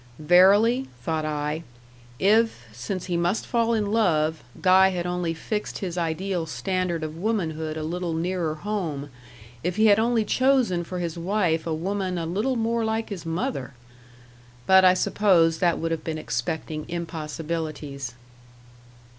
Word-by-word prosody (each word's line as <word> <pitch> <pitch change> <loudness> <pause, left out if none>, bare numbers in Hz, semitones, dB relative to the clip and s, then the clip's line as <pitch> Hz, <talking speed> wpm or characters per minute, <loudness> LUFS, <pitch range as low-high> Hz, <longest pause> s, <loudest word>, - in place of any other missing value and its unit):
"Verily," 200 - +5 0.2
thought 160 -1 -1
I, 150 +1 -2 0.6
"if, 210 - +2
since 120 - -5
he 180 - -2
must 175 +5 0
fall 235 -1 +1
in 215 -2 0
love, 160 - +1 0.2
Guy 190 0 +6
had 180 -2 -3
only 175 -2 -2
fixed 210 +5 -4
his 180 -3 -4
ideal 175 +1 -2
standard 185 -1 -2
of 155 0 -5
womanhood 160 -6 -2
a 155 - -3
little 170 +1 -3
nearer 165 -1 -1
home 155 -7 -4 0.5
if 180 +1 -1
he 215 +1 +3
had 205 -1 +6
only 230 -1 +2
chosen 255 -10 +2
for 180 +2 -6
his 170 -1 -3
wife 170 -3 0
a 165 - 0
woman 185 +2 -2
a 165 - -2
little 210 +10 -1
more 230 0 0
like 220 0 -1
his 180 -5 -6
mother!" 140 -6 -3 0.9
But 190 0 +6
I 185 0 +6
suppose 170 -5 +3
that 175 -2 +2
would 165 0 -2
have 165 - -2
been 160 -1 -3
expecting 155 +2 -4
impossibilities. 155 -5 -5
175 Hz, 150 wpm, -25 LUFS, 160-200 Hz, 0.9 s, Guy